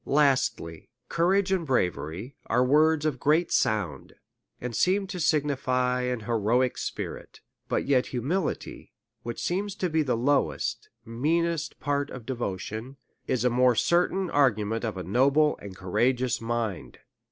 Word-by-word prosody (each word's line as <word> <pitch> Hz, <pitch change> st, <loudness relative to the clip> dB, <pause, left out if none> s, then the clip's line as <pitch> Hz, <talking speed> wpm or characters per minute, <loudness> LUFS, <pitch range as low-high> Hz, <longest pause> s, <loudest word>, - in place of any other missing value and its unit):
Lastly, 135 Hz, -, +1 dB, 0.2 s
Courage 190 Hz, +3 st, +2 dB
and 190 Hz, -3 st, +1 dB
bravery 100 Hz, -, -2 dB
are 125 Hz, +2 st, +2 dB
words 155 Hz, +3 st, +3 dB
of 155 Hz, -, +2 dB
a -, -, -15 dB
great 155 Hz, +5 st, +2 dB
sound, 95 Hz, -11 st, 0 dB, 0.5 s
and 125 Hz, -2 st, -5 dB
seem 195 Hz, -, +2 dB
to 185 Hz, -1 st, -6 dB
signify 130 Hz, -5 st, +1 dB
an 125 Hz, -2 st, -2 dB
heroic 120 Hz, +3 st, +1 dB
spirit; -, -, -6 dB, 0.3 s
but -, -, 0 dB
yet 135 Hz, -2 st, +2 dB
humility, 150 Hz, +9 st, -3 dB, 0.3 s
which 120 Hz, 0 st, -6 dB
seems 195 Hz, +2 st, -2 dB
to 180 Hz, -4 st, -2 dB
be 160 Hz, 0 st, +2 dB
ihe 145 Hz, -, -3 dB
lowest, 140 Hz, +3 st, 0 dB, 0.2 s
meanest 155 Hz, +6 st, -1 dB
part 145 Hz, 0 st, -1 dB
of 125 Hz, -3 st, -9 dB
devotion, 115 Hz, +1 st, -5 dB, 0.3 s
is 125 Hz, -1 st, 0 dB
a 125 Hz, -, +3 dB
more 125 Hz, 0 st, +4 dB
certain 180 Hz, -, +2 dB
argument 115 Hz, -6 st, +1 dB
of 110 Hz, -4 st, -3 dB
a 95 Hz, -, -4 dB
noble 140 Hz, -, +3 dB
and 100 Hz, -2 st, -9 dB
courageous 120 Hz, +6 st, 0 dB
mind. 115 Hz, -4 st, -3 dB
130 Hz, 140 wpm, -27 LUFS, 115-155 Hz, 0.5 s, more